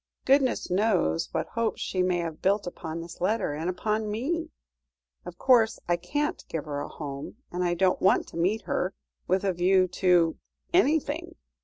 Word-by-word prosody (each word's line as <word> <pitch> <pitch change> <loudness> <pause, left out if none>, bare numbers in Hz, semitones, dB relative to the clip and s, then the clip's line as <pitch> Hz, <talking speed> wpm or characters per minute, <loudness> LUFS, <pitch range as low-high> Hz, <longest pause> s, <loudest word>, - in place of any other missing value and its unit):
Goodness 265 -7 +2
knows 185 -4 +1
what 160 - -1
hopes 230 -1 -1
she 185 - -1
may 180 -1 +2
have 165 -2 -4
built 200 +2 +2
upon 165 -2 -5
this 170 +1 -10
letter, 200 -4 +1
and 160 +4 -2
upon 215 +4 -1
me. 320 +10 -2 0.8
Of - - -8
course, 230 -3 +4
I 175 - +3
can't 290 - -2
give 160 -3 -3
her 145 -2 -3
a - - -4
home, 140 +1 -7 0.2
and 180 +1 -1
I 175 -1 +1
don't 185 +1 +2
want 190 - +4
to - - -9
meet 195 +6 +1
her 185 +1 -1 0.3
with 185 +2 +1
a 195 -2 +1
view 185 +1 +3
to 175 -3 +4 0.4
anything. 325 0 +1
185 Hz, 175 wpm, -27 LUFS, 170-225 Hz, 0.8 s, course